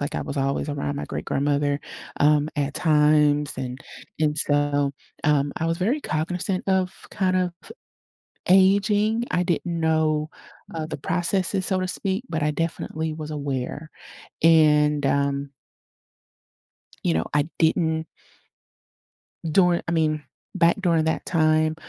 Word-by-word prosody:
like, 145 - -3
I - - -2
was 140 - -6
always 135 +2 -1
around 145 0 -3
my - - -4
great-grandmother, 145 0 -1 0.4
um, 150 0 +4
at 145 -1 -1
times, 150 -2 +3
and 130 0 -5 0.4
and 150 -1 +1
so, 145 -1 +1 0.3
um, 145 -1 +2
I 165 - -1
was 165 0 0
very 235 +11 0
cognizant 180 - -2
of 190 -1 +2 0.2
kind 185 -1 0
of 180 -1 0 1.0
aging, 205 +4 +4
I 180 - +1
didn't 170 -1 -1
know, 155 -1 +1 0.5
uh, 160 -1 -3
the - - -5
processes, 180 +4 0
so 190 -2 +1
to 185 - -2
speak, 195 +4 -2
but 160 -2 -2
I 150 - +1
definitely 160 0 -3
was 155 0 -7
aware, 145 +1 -4 0.5
and, 150 -3 +4
um 140 0 0 1.5
you 85 - +2
know, 80 - 0
I 150 +2 +2
didn't 160 0 +1 1.4
during 180 +1 +3
I 170 - 0
mean, 155 -2 +1 0.3
back 170 +4 +3
during 170 -4 +2
that 160 - -1
time, 155 -1 +2
155 Hz, 135 wpm, -24 LUFS, 145-175 Hz, 1.5 s, um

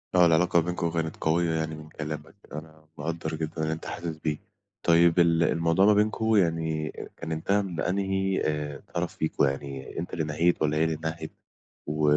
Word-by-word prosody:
آه، 90 - +7
العلاقة 85 +1 +4
ما 80 - 0
بينكم 90 -1 -1
كانت 80 -1 -2
قوية 80 +1 +2
يعني 80 0 -2
من 75 0 -11
كلامك، 75 +1 -6 0.2
أنا 80 0 -9
مقدّر 80 +1 -3
جدًا 80 0 -4
اللي 80 0 0
أنت 80 - -7
حاسس 85 -2 -4
بيه. 75 -1 -2 0.5
طيب 85 +1 +5
ال 85 -1 +4
الموضوع 85 +3 +3
ما 105 - +7
بينكم 110 +2 +2
يعني 80 -4 +1
آآ، - - -8
كان 80 -1 -6
انتهى 100 +6 +1
من 90 -4 -5
أنهِي 95 0 0
آآ، 75 -2 -2
طرف 85 0 -2
فيكم، 80 - 0
يعني 70 +1 -4
أنت 85 - -5
اللي 80 - 0
نهيت 80 +4 +1
والّا 75 0 +2
هي 80 - +3
اللي 80 -1 0
نهِت 80 0 -4 0.6
و 75 +1 -1
80 Hz, 190 wpm, -27 LUFS, 80-85 Hz, 0.6 s, آه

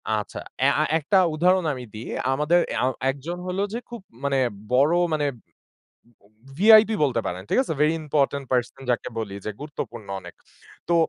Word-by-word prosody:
আচ্ছা 105 -1 -4 0.2
অ্যা 135 +2 +4
আ - - +4
একটা 165 +6 +1 0.2
উদাহরণ 180 +3 +3
আমি 130 -2 -7
দিই। 110 +2 -7 0.3
আমাদের 150 +5 +3
অ্যা - - 0 0.3
একজন 150 +6 -6
হলো 185 +2 -2
যে 235 - -2
খুব 235 -2 -8 0.2
মানে 140 -1 +1 0.4
বড় 140 +6 +4 0.2
মানে 150 -1 +1
উম 120 -4 -21 0.6
বম 100 - -27 0.3
VIP 215 +3 +7
বলতে 125 -5 +1
পারেন, 90 +1 -3
ঠিক - - +2
আছে? 210 - -3
Very 150 +1 +4
important 140 -2 0
person 125 +1 -1
যাকে 120 - 0
বলি 100 -3 -5
যে 105 - -2
গুরুত্বপূর্ণ 120 -8 -7
অনেক। - - -12 0.5
তো 170 - +4
145 Hz, 175 wpm, -24 LUFS, 125-170 Hz, 0.6 s, VIP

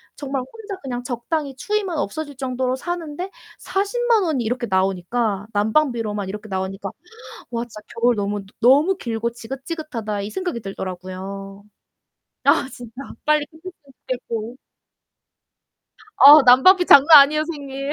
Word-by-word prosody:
정말 275 -2 -4
혼자 405 - -9
그냥 245 -3 -5
적당히 270 +4 -3
추위만 405 -1 -2
없어질 290 +2 -4
정도로 255 -1 -2
사는데 350 +2 -5 0.3
400,000 445 +2 0
원이 280 -9 -1
이렇게 245 +1 -2
나오니까 195 +2 -1
난방비로만 215 -3 0
이렇게 210 +2 -7
나오니까 195 0 -4 0.6
'와 235 0 -2
진짜 220 -3 -11 0.2
겨울 240 0 +3
너무 205 0 -2 0.2
너무 290 +10 +4
길고 230 -5 -3
지긋지긋하다.' 260 -3 -6
이 205 - -5
생각이 360 -10 -3
들더라고요. 195 +1 -7 0.8
아 - - +3
진짜 240 -2 -11 0.3
빨리 300 -1 +2
끝났으면 325 +4 -12 0.4
좋겠고. 235 -1 -4 1.6
어 290 +2 +10
난방비 275 +9 +6
장난 290 +2 +9
아니에요 305 +2 0
선생님. 280 -3 -5
255 Hz, 310 characters per minute, -21 LUFS, 215-305 Hz, 1.6 s, 어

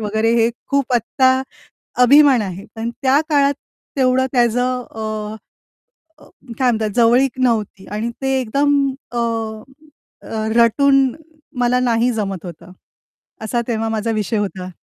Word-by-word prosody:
वगैरे 220 +2 0
हे 230 +1 +3 0.2
खूप 275 -2 0
आत्ता 260 +3 +2 0.7
अभिमान 280 -1 +6
आहे, 195 -1 -6
पण 225 +1 -3
त्या 270 +2 +3
काळात 285 -2 +3 0.4
तेवढं 260 0 +2
त्याचं 245 0 +1
अ, 215 -1 -5 0.9
अ, - - -16 0.3
काय 255 - +3
म्हणतात 220 -2 -1
जवळीक 245 +2 +3
नव्हती 220 -6 -1
आणि 215 +3 -2
ते 270 - -1
एकदम 280 +4 +1 0.4
अ, 240 - -5 1.0
अ, 220 -1 -4
रटून 270 +4 +4 0.5
मला 245 +1 +2
नाही 240 0 +1
जमत 195 -3 -4
होतं. 170 +1 -10 0.7
असा 230 +2 -1
तेव्हा 225 -1 -1
माझा 220 +1 -2
विषय 215 +1 -1
होता. 190 -3 -4
235 Hz, 130 wpm, -18 LUFS, 215-255 Hz, 1.0 s, अभिमान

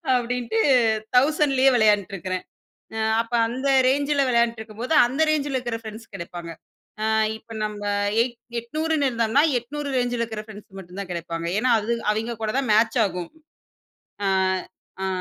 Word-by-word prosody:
அப்பிடீன்ட்டு 240 -2 -1 0.6
1000லேயே 275 -1 +4
வெளையாண்ட்ருக்கிறேன். 195 -4 +1 0.5
அ - - -2 0.2
அப்ப 230 +1 -18 0.2
அந்த 260 +4 -2 0.2
ரேஞ்சுல 285 +1 +2
வெளையாண்ட்ருக்கும்போது, 235 +1 -1
அந்த 265 +5 -4
ரேஞ்சுல 290 -3 0
இருக்குற 240 -3 -3
ஃபிரெண்ட்ஸ் 220 0 -10
கெடைப்பாங்க. 170 -1 -7 0.5
அ - - 0 0.3
இப்ப 225 +1 -14
நம்ப 210 -1 -5 0.4
8 235 0 -1 0.2
800ன்னு 305 +3 0
இருந்தோம்ன்னா, 230 +3 +2 0.2
800 285 +4 -6
ரேஞ்சுல 245 -1 -1
இருக்கிற 220 -2 -4
ஃபிரெண்ட்ஸ் 210 -2 -12
மட்டும் 185 +1 -9
தான் 195 -2 -7
கெடைப்பாங்க. 170 -1 -4
ஏன்னா, 250 +2 +2
அது 215 +3 -2 0.2
அவெங்க 225 +2 -3
கூட 215 - 0
தான் 260 -5 -1
மேட்ச் 225 +3 +3
ஆகும். 180 -3 -5 1.0
அ, - - +2 0.8
அ. - - 0
230 Hz, 140 wpm, -24 LUFS, 210-255 Hz, 1.0 s, 1000லேயே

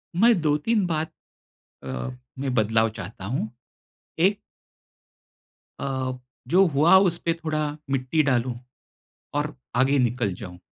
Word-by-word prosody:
मैं 225 +2 +5
2-3 160 +8 +2
बात 160 -1 -1 0.7
अ, 65 - -4 0.3
में 130 -2 -2
बदलाव 110 0 +3
चाहता 95 0 -7
हूँ। 110 0 -2 0.7
एक 195 +4 +3 1.4
अ, 130 -1 -2 0.4
जो 190 +4 +5
हुआ, 155 +6 +6
उसपे 175 -3 +2
थोड़ा 155 -3 -2
मिट्टी 135 +4 +1
डालूँ, 120 -1 0 0.8
और 150 0 -1 0.2
आगे 135 +2 +4
निकल 120 -5 +1
जाऊँ। 90 -1 -9
140 Hz, 110 wpm, -25 LUFS, 120-165 Hz, 1.4 s, हुआ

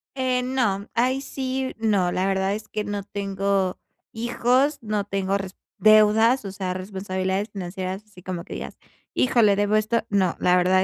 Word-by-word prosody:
Eh, 255 -1 0
no, 230 -6 0
ahí 255 +3 +1
sí, 265 -1 -3
no, 200 -5 +2
la 185 +2 0
verdad 195 0 +1
es 215 +1 -6
que 210 - -3
no 205 -1 -3
tengo 195 -1 -1 0.3
hijos, 250 +5 +1
no 210 -2 -2
tengo 195 0 -1
resp 190 -1 -7 0.2
deudas, 215 +3 +5
o 195 - -4
sea, 190 -1 -3
responsabilidades 190 +1 -2
financieras, 190 0 -5
así 200 -4 -16
como 180 -1 -5
que - - -9
digas: - - -7 0.4
"Híjole, 230 -5 +4
debo 205 +1 +1
esto", 215 +2 +1
no, 190 -4 +2
la 180 - +4
verdad 185 +1 +4
205 Hz, 165 wpm, -24 LUFS, 190-230 Hz, 0.4 s, deudas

